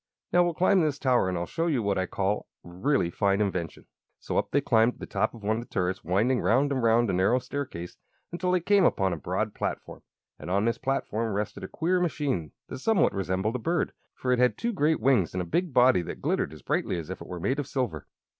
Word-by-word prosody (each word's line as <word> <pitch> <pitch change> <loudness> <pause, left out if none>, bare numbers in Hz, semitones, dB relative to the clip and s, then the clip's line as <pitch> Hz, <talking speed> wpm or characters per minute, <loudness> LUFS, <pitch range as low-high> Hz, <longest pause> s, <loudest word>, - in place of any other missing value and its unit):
Now 175 - +6
we'll 175 -2 -1
climb 185 +2 +4
this 150 -3 0
tower, 125 -9 +2
and 90 - -2
I'll 85 - -2
show 165 - -2
you 135 -9 +1
what 100 -2 0
I 95 - -1
call 100 +3 -1 0.2
a - - -11
really 90 +1 0
fine 100 +2 +1
invention." 90 -6 -2 0.3
So - - -5
up - - -3
they 140 - +2
climbed 115 -3 +3
to - - -23
the - - -6
top - - -1
of 110 - -13
one 110 +2 +1
of - - -3
the 120 - -12
turrets, 95 +1 -1
winding 110 +9 +1
round 140 +5 +2
and 130 -2 0
round 115 +1 +3
a - - -2
narrow 95 +7 +3
staircase 125 -9 -5 0.3
until 180 +1 -1
they 180 -1 +2
came 200 +3 +4
upon 95 -3 +2
a - - -1
broad 75 - -2
platform. - - -5 0.4
And 75 - -7
on 100 +3 +1
this 115 - 0
platform 115 -5 -1
rested 105 -1 -3
a - - -4
queer 180 - 0
machine 140 - -1 0.2
that - - -7
somewhat 220 +7 +2
resembled 95 +4 -1
a - - -9
bird, 165 +8 -1 0.2
for 125 - -2
it 125 - +2
had 125 0 +3
two 235 0 -2
great 160 -3 +2
wings 115 -8 +2
and 90 - 0
a - - -7
big 175 - -1
body 125 -7 +5
that 85 - -7
glittered - - -1
as 75 -5 -12
brightly - - -1
as 80 -3 -6
if - - -7
it - - -9
were 90 - -6
made 130 - -1
of 145 - -3
silver. 120 - -3
115 Hz, 250 wpm, -27 LUFS, 95-145 Hz, 0.4 s, Now